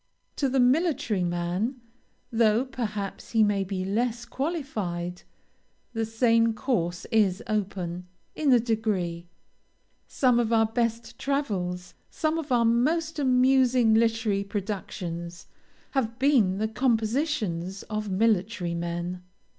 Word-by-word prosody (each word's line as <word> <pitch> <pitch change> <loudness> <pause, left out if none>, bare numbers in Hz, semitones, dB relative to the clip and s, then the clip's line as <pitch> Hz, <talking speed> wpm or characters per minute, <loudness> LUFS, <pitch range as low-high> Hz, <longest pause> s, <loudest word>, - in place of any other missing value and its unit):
To 275 - +1
the 265 +1 +1
military 250 - +2
man, 175 +8 -1 0.5
though 225 +1 +3
perhaps 215 -8 -5
he 225 -1 +5
may 205 -2 +2
be 190 -1 -3
less 235 +4 -1
qualified, 215 - -3 0.7
the 225 -1 -1
same 230 0 +2
course 180 -9 -1
is 205 -4 +2
open, 185 -4 -3 0.3
in 295 -3 +1
a 245 - +7
degree. 205 -7 -1 0.8
Some 250 -3 +2
of 235 -1 0
our 225 -1 +4
best 230 +1 -2
travels, 185 -11 -2 0.2
some 315 0 -1
of 310 -4 -6
our 240 -2 +4
most 310 +8 +1
amusing 255 -3 +4
literary 225 -3 +2
productions, 185 -4 -5 0.5
have 230 -4 -1
been 250 -9 +3
the 215 +2 0
compositions 220 - -1
of 215 -1 -4
military 195 -2 +1
men. 170 +1 -3
225 Hz, 115 wpm, -27 LUFS, 185-250 Hz, 0.8 s, a